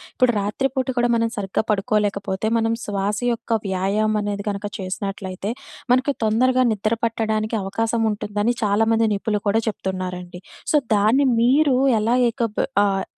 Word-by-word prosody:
ఇప్పుడు 255 -2 +4
రాత్రిపూట 260 +6 -1
కూడా 240 0 +2
మనం 230 0 +1
సరిగ్గా 195 +1 -1
పడుకోలేకపోతే, 205 -1 0
మనం 225 0 +1
శ్వాస 205 0 -1
యొక్క 230 0 -1
వ్యాయామం 200 +3 0
అనేది 205 -1 -3
కనుక 200 0 -3
చేసినట్లయితే, 190 +1 -4 0.4
మనకు 260 +3 +2
తొందరగా 255 +4 +3
నిద్ర 215 +2 -1
పట్టడానికి 220 -1 -1
అవకాశం 225 +4 -1
ఉంటుందని 210 +2 -1
చాలామంది 225 +2 +2
నిపుణులు 210 +1 -2
కూడా 220 +3 +2
చెప్తున్నారండి. 180 -3 -5 0.3
సో - - +6 0.2
దాన్ని 225 +7 +3
మీరు 270 +3 +4 0.3
ఎలా 230 +3 +2 0.2
ఏకబ్ 230 -3 -2 0.2
ఆహ్, 195 -1 0
215 Hz, 130 wpm, -22 LUFS, 200-230 Hz, 0.4 s, సో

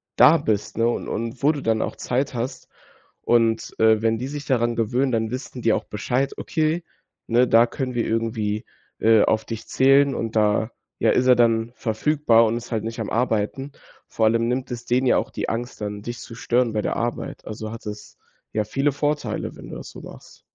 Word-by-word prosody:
da - - +7
bist, 105 -1 -2
ne? 115 0 +3
Und 120 - -2
und 115 +2 -4
wo 150 - +6
du 145 -3 -5
dann 110 -1 +1
auch - - -3
Zeit 130 +2 -1
hast. 120 +2 -4 0.5
Und, 115 -1 +1
äh, 110 -1 +4
wenn 115 0 +2
die 125 - -4
sich 145 0 -6
daran 120 -2 +1
gewöhnen, 125 +4 +1
dann 110 0 0
wissen 125 -1 -6
die 115 -1 +3
auch - - -1
Bescheid: 125 +6 -1
„Okay, 160 +2 -1 0.4
ne, 120 +2 +3
da 115 +1 +6
können 130 0 -4
wir 120 - 0
irgendwie, 110 -2 -1 0.3
äh, 110 -1 +5
auf 110 0 +1
dich 115 -1 -6
zählen 135 +1 +4
und 115 -1 -4
da, 110 +1 +2 0.3
ja, - - +3
ist 125 - +2
er 125 - +7
dann 115 -1 +2
verfügbar 115 0 +2
und 115 +2 0
ist 120 +1 -9
halt 110 -2 -1
nicht 115 +1 -5
am 110 - -4
Arbeiten.“ 120 +4 -1 0.4
Vor 110 - 0
allem 115 +1 +2
nimmt 125 +1 -2
es 120 0 -6
denen 125 +2 +1
ja - - +4
auch - - -1
die - - -3
Angst 120 +2 -4
dann, 105 0 -4
dich 120 +2 -6
zu 115 - -10
stören 120 0 +1
bei 105 - 0
der - - -2
Arbeit. 120 0 -4
Also 110 0 -6
hat 115 -1 -9
es 105 0 -8 0.4
ja 110 - +1
viele 135 +7 0
Vorteile, 145 +2 -2
wenn - - -11
du - - -7
das - - -9
so - - -11
machst. - - -13
115 Hz, 215 wpm, -23 LUFS, 110-130 Hz, 0.5 s, da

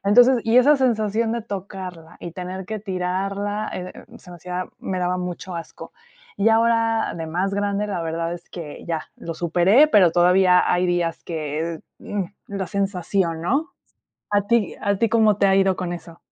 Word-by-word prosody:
entonces, 245 +5 +6
y 225 +2 +3
esa 285 +4 +7
sensación 225 -3 +1
de 235 -1 -2
tocarla 190 -5 -7
y 170 - -7
tener 185 +1 -6
que 220 0 -4
tirarla, 195 +2 -2
eh 180 0 -6
eh, - - -12
se 180 - -15
me 175 - -9
hacía 180 +1 -4
me 185 -1 -3
daba 180 0 0
mucho 180 0 -5
asco, 170 - -8 0.4
y 205 +2 +3
ahora, 225 0 +2
de 160 - -4
más 185 +5 -1
grande, 205 +1 -1
la 195 -4 -3
verdad 165 +1 -2
es 175 - -9
que 160 -4 -8
ya, 165 -2 -2
lo 165 -1 -6
superé, 180 - +4
pero 190 - +5
todavía 180 +1 +5
hay 180 +1 +2
días 175 -2 -1
que, 160 0 -4 0.2
mm, 200 -2 -3 0.2
la 195 -2 -3
sensación, 190 -3 -1
¿no?, 275 - 0 0.6
a 205 -1 +3
ti 235 -3 +1
a 200 0 +1
ti, 230 0 +2
¿cómo 220 -3 +4
te 200 - +3
ha 195 - +4
ido 195 -1 +3
con 180 -1 -4
eso? 170 -1 -9
190 Hz, 185 wpm, -22 LUFS, 175-210 Hz, 0.6 s, esa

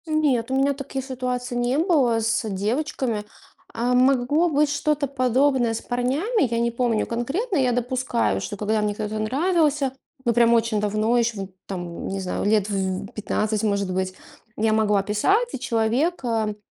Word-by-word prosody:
Нет, 290 -7 +1
у - - +1
меня 275 +1 +2
таких 270 -1 -5
ситуаций 250 -1 -3
не 245 +3 +1
было 295 - +3
с 225 0 0
девочками. 225 +2 -1 0.5
А, 240 +2 0
могло 265 +6 +3
быть 295 -1 +2
что-то 295 0 0
подобное 255 -2 +2
с 225 - -4
парнями, 275 - 0
я 230 - +1
не 235 0 +1
помню 235 -2 0
конкретно, 285 - -2
я 255 -3 +2
допускаю, 240 - 0
что 205 - -5
когда 215 +1 0
мне 210 -1 -1
кто-то 215 +1 -3
нравился, 290 +2 +1 0.3
ну 235 - +3
прям 235 0 +4
очень 230 -2 +2
давно, 215 +3 +1
еще 235 -2 +1
в 195 - -6 0.2
там, 175 -3 -5
не 195 - -3
знаю, 185 0 -3
лет 210 -1 +2
в 190 -1 -2
15, 215 0 -1
может 200 -3 0
быть, 185 0 -1 0.4
я 220 0 +2
могла 210 -2 +2
писать. 390 - +2
И, - - -4
человек, 250 +8 0
эм, 220 -3 -1
240 Hz, 170 wpm, -23 LUFS, 215-270 Hz, 0.5 s, прям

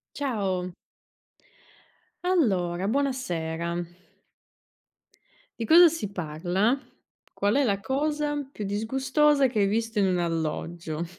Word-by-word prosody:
Ciao. 195 -10 -2 1.5
Allora, 195 - +1
buonasera. 175 -11 -2 1.8
Di 225 - -2
cosa 340 +6 +8
si 305 -11 -4
parla? 180 - 0 0.6
Qual 205 +2 +1
è 285 - +3
la 200 -5 +1
cosa 295 +4 -1
più 215 - -6
disgustosa 265 +7 +2
che 230 -4 -1
hai 200 - +4
visto 225 +2 -1
in 200 - +4
un 185 -1 +1
alloggio? 165 0 -3
205 Hz, 100 wpm, -26 LUFS, 175-275 Hz, 1.8 s, cosa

